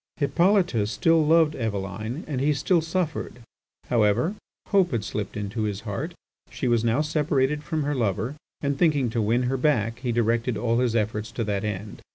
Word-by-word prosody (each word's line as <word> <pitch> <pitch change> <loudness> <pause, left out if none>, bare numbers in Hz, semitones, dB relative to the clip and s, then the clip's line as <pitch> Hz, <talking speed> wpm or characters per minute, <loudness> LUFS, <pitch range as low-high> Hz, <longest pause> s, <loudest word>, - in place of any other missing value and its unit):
Hippolyte 170 - +2
still 160 +9 +3
loved 160 0 +4
Eveline 110 - -4
and 135 -4 -3
he 150 +1 +2
still 165 +5 +2
suffered. 160 -7 -3 0.4
However, 115 - +2 0.4
hope 195 -3 +4
had 115 -5 -1
slipped 105 -1 -4
into 105 +2 -3
his 105 -1 -2
heart. 135 - -4 0.3
She 130 - -3
was 120 -2 +2
now 120 +5 +2
separated 150 -1 0
from 155 0 -2
her 145 +1 -1
lover, 115 0 -1 0.3
and, 140 -1 -1
thinking 145 -8 +2
to 115 - 0
win 115 +4 +2
her 130 +2 0
back, 115 -5 +1
he 125 -1 -2
directed 115 0 +1
all 115 0 +1
his 125 -2 +1
efforts 110 0 -1
to 115 - -2
that 100 -2 -2
end. 105 0 -5
125 Hz, 180 wpm, -25 LUFS, 110-150 Hz, 0.4 s, loved